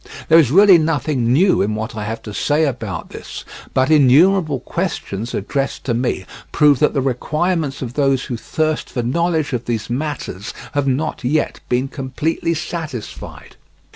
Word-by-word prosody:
There 165 +1 +8
is 145 -7 +4
really 190 +3 +7
nothing 150 -6 0
new 180 +8 +4
in 105 +2 0
what 110 +1 -4
I 105 -1 -4
have 115 +1 -5
to 105 - -7
say 150 +8 +1
about 115 -8 -4
this; - - -8 0.3
but 130 +3 +2
innumerable 155 +2 +4
questions 110 0 -3
addressed 135 +7 -2
to 120 - -1
me 120 -5 -1 0.3
prove 145 -4 +4
that 150 - +2
the 135 - +2
requirements 150 +3 -1
of 120 -1 -6
those 135 -2 +1
who 125 - -4
thirst 155 +6 -2
for 120 - -3
knowledge 160 +3 0
of 120 -1 -2
these 115 -1 -3
matters 130 -8 -4 0.2
have 145 -1 0
not 135 +2 -1
yet 150 +5 0
been 125 +2 +1
completely 150 +5 -2
satisfied. 160 -7 -7
135 Hz, 165 wpm, -19 LUFS, 120-155 Hz, 0.3 s, There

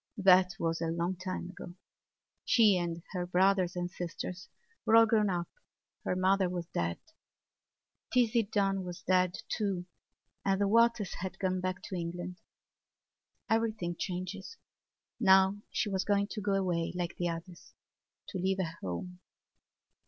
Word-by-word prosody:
That 185 -2 +5
was 165 0 -1
a 165 - 0
long 170 +3 -1
time 185 0 -5
ago; 175 -1 -10 0.7
she 215 -5 +5
and 170 -2 -2
her 180 -2 -3
brothers 185 0 +3
and 175 0 -3
sisters 175 +1 -6 0.3
were 220 - +4
all 230 0 +9
grown 215 -2 +3
up; 175 -2 -1 0.6
her - - 0
mother 190 0 +3
was 175 -1 -3
dead. 85 0 -1 1.1
Tizzie 240 -1 +3
Dunn 200 -2 0
was 180 -1 -7
dead, 185 +3 +2
too, 195 -5 -1 0.6
and 195 -1 +1
the 200 - +2
Waters 230 -1 +3
had 190 +1 -5
gone 185 -1 -1
back 185 0 -3
to 190 - -5
England. 175 +1 -5 1.1
Everything 220 -6 0
changes. 185 - -5 0.6
Now 190 -2 +5
she - - -1
was 190 -2 0
going 200 0 +2
to 215 - -4
go 200 0 0
away 175 -4 0
like 175 -1 -3
the 175 -1 0
others, 170 +1 -8 0.5
to 190 - -4
leave 190 +1 +1
her 170 -3 -3
home. 180 - -5
185 Hz, 145 wpm, -31 LUFS, 175-200 Hz, 1.1 s, all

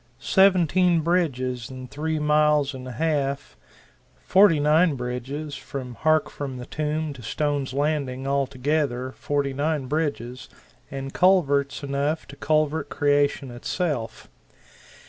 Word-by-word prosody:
Seventeen 180 +1 +3
bridges 130 -9 -1
in 130 -1 -8
three 155 +4 -3
miles 150 -1 +2
and 130 -1 -8
a 125 - -6
half 140 - -1 0.6
forty 185 -5 +4
nine 155 +2 +3
bridges 130 +4 -5
from 130 -2 -6
Hark 155 +4 +2
from 135 -3 -5
the 125 - -7
Tomb 155 +1 -2
to 130 - -12
Stone's 145 +3 -2
Landing 140 -2 -1
altogether 135 -1 -1
forty 140 0 -2
nine 145 0 -1
bridges, 130 -4 -3 0.4
and 135 0 -6
culverts 145 -7 +2
enough 140 +3 -1
to 140 - -10
culvert 155 0 0
creation 145 -2 +1
itself! 120 -1 -3
145 Hz, 120 wpm, -24 LUFS, 130-155 Hz, 0.6 s, forty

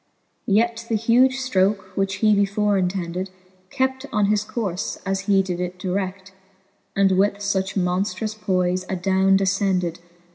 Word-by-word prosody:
Yet 230 +2 +1
the 225 - +1
huge 240 +4 +3
ftroke, 200 -6 0
which 195 0 0
he 215 - +6
before 205 +1 +1
intended, 180 0 -2 0.4
Kept 265 0 -1
on 210 -3 +2
his 210 0 +1
courfe, 200 -5 -3
as 195 0 -1
he 195 -1 +4
did 180 -2 -4
it 180 0 -4
dired, 190 +1 -4 0.6
And 195 -1 +3
with 200 +1 +3
fuch 195 -1 -2
monftrous 190 +3 -1
poife 185 -3 0
adowne 190 +1 +2
defcended. 190 -3 0
195 Hz, 140 wpm, -22 LUFS, 185-210 Hz, 0.6 s, he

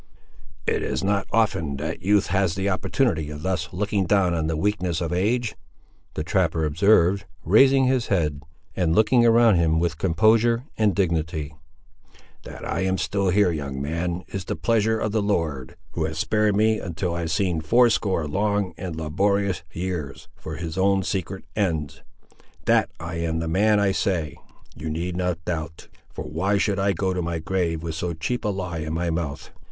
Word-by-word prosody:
"It - - 0
is - - -2
not 100 0 0
often 85 -11 +1
that 80 +3 -4
youth 100 +2 +3
has 95 -3 +1
an 95 0 -1
opportunity 95 - 0
of 75 0 -7
thus 85 -5 -2
looking 100 0 -1
down 95 -3 +3
on 80 -2 -1
the 80 -1 -1
weakness 90 -2 0
of 85 -1 -2
age!" 110 +5 0 0.6
the 75 - -2
trapper 85 -3 +1
observed, 95 +4 +3 0.2
raising 130 - +5
his 130 -2 +1
head, 75 -7 0 0.3
and 85 -3 +1
looking 120 +3 +4
around 115 -3 +5
him 80 -1 +2
with 85 -1 -1
composure 110 +7 +3
and 105 -4 +2
dignity. 80 -4 -1 0.9
"That - - -9
I - - -2
am 95 0 +1
still 95 +2 0
here, 95 0 +3
young 70 -4 -4
man, 85 +5 -2
is 95 -2 -5
the - - -3
pleasure 110 -1 +1
of 110 -1 -2
the 110 0 +1
Lord, 80 -10 -2 0.2
who 80 - -1
has 80 0 -4
spared 105 +3 +1
me 110 +1 +3
until 85 -1 -3
I 85 - -3
have 80 -1 -2
seen 85 -2 0
fourscore 105 -4 +2
long 100 +2 0
and 90 -3 -5
laborious 95 +5 0
years, 85 -5 -5
for 80 - -7
his 85 +2 -5
own 95 0 +3
secret 95 -1 -3
ends. 80 -9 -1 0.6
That - - +3
I 85 +1 -5
am 85 -1 -1
the 80 0 -2
man 105 +5 +3
I 100 -1 +2
say, 90 -7 -1 0.4
you 80 +2 -5
need 85 +3 -3
not 90 -2 -2
doubt; 80 -2 -5 0.2
for - - -7
why 95 +7 0
should 100 0 0
I 100 +1 +2
go 95 +1 -1
to 90 - -2
my 85 0 -2
grave 85 -1 -1
with 85 -1 -3
so 85 +2 -3
cheap 120 +10 -3
a 105 - 0
lie 90 -4 -3
in 80 0 -4
my 85 0 -1
mouth?" 80 -4 -4
90 Hz, 180 wpm, -24 LUFS, 80-100 Hz, 0.9 s, raising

